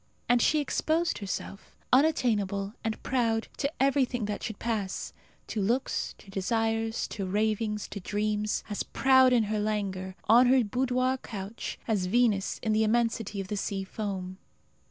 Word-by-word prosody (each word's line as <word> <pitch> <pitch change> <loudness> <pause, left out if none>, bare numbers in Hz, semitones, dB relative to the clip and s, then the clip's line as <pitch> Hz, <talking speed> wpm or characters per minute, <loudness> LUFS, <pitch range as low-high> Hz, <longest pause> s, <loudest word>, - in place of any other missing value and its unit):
And 245 0 +4
she 310 - +3
exposed 320 +3 0
herself, 200 0 -6 0.2
unattainable 215 -9 +2
and 220 -1 -3
proud, 230 -3 +1
to 280 - -1
everything 260 -4 +2
that 210 0 -3
should 220 - -5
pass 215 -5 -3 0.3
to 215 - -3
looks, 240 +7 -1
to 195 - -15
desires, 225 +3 0
to 195 -4 -4
ravings, 210 +1 0
to 200 - -6
dreams; 210 +2 -1
as 205 -2 -3
proud 260 -1 +4
in 240 -3 +4
her 215 0 -1
languor, 195 -3 -2
on 240 +3 +7
her 255 0 +5
boudoir 255 +3 0
couch, 205 0 -6
as 205 -5 +1
Venus 215 -2 +2
in 220 - +1
the 220 +1 +3
immensity 225 -2 0
of 195 - -4
the 210 - -2
sea 195 -1 -2
foam. 190 -2 -5
220 Hz, 155 wpm, -28 LUFS, 200-245 Hz, 0.3 s, on